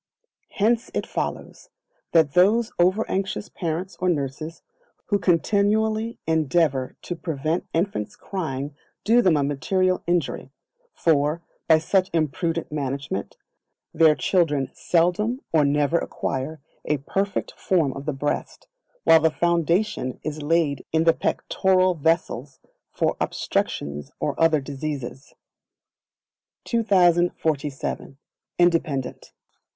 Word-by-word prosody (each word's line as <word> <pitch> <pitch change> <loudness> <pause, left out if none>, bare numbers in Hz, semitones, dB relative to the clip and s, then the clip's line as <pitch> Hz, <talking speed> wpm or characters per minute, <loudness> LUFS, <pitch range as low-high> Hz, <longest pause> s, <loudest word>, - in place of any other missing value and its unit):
Hence 230 +4 +1
it - - -1
follows, - - -5 0.4
that 160 -4 +4
those 215 +6 +4
over 185 +5 +3
anxious 195 +2 -2
parents 175 +1 -4
or 180 - +1
nurses, 155 +1 -3 0.5
who 205 -1 +2
continually 215 +5 +1
endeavour 155 -4 +1
to 175 - -4
prevent 160 0 -2
infants 165 - -2
crying 145 -7 -4 0.3
do 235 +3 +5
them 180 -8 +4
a 145 - +1
material 185 +7 0
injury; 170 -6 -1 0.4
for, 155 +1 +1 0.2
by 160 - +7
such 185 +4 +1
imprudent 165 +1 -1
management, 145 - -4 0.6
their 160 -2 +5
children 150 -8 +1
seldom 180 +9 +1
or 155 -2 +5
never 145 +3 +2
acquire 140 +4 -4 0.2
a 150 - 0
perfect 195 +8 -2
form 160 -8 0
of 140 +2 -8
the - - +1
breast, 145 +1 -3 0.4
while 165 - +7
the 160 +1 +3
foundation 170 - 0
is 155 0 -4
laid 150 -2 +1
in 160 0 +2
the 165 0 +5
pectoral 185 +1 +1
vessels 150 -5 -1 0.3
for - - 0
obstructions 70 0 -2
and - - -1
other 165 -2 +4
diseases. 135 -2 -6 1.3
2047. 175 - +1 0.4
Independent. 160 -7 0
165 Hz, 110 wpm, -24 LUFS, 145-185 Hz, 1.3 s, by